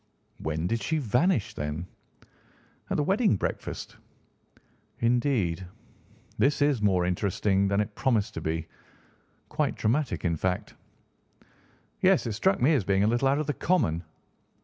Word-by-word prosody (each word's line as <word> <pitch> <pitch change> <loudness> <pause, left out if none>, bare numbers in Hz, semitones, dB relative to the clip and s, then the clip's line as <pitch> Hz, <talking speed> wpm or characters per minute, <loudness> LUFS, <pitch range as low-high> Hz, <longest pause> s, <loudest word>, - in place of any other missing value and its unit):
"When 80 +1 -2
did 115 +5 -1
she 160 - 0
vanish, 135 - +1
then?" 75 +3 -4 1.0
"At - - 0
the 150 - +2
wedding 200 - +3
breakfast." - - -4 1.0
"Indeed. 115 - +1 0.8
This 140 +2 +3
is 145 -6 +2
more 95 -4 +2
interesting 95 +2 +1
than 100 +1 +1
it 105 0 -1
promised 110 -3 0
to - - -5
be; 80 +1 -2 0.8
quite - - 0
dramatic, 125 +1 0
in 85 -2 +1
fact." 90 +2 -2 1.3
"Yes; 185 -4 +4
it 115 - -2
struck 190 - +2
me 145 +6 +4
as 135 -9 +2
being 95 +1 +2
a - - +3
little 120 +4 +2
out 135 +1 +3
of 155 - -1
the 145 - -1
common." 90 - +1
110 Hz, 145 wpm, -27 LUFS, 90-140 Hz, 1.3 s, Yes